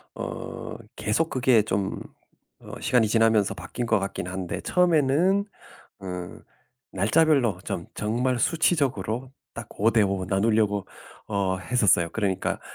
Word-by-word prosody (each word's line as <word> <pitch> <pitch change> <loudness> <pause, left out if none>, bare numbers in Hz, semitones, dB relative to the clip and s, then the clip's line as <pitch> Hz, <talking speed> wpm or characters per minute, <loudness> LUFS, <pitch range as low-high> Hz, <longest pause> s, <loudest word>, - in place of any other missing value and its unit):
어 - - -6 0.2
계속 160 +10 0
그게 125 -3 +3
좀 100 -2 -2 0.6
어 - - -12
시간이 120 -4 +3
지나면서 115 -2 +3
바뀐 90 +8 -5
것 110 -3 +2
같긴 95 -2 -4
한데 90 -1 -4
처음에는 180 +3 +2 0.6
음 90 -1 -7 0.5
날짜별로 120 - +2
좀 90 -4 -4
정말 120 +4 0
수치적으로 130 - 0 0.2
딱 115 0 -7
5:5 100 -4 +2
나누려고 105 0 +1 0.4
어 100 -2 0
했었어요. 95 -6 +2
그러니까 100 -4 -1
110 Hz, 245 characters per minute, -25 LUFS, 95-130 Hz, 0.6 s, 그게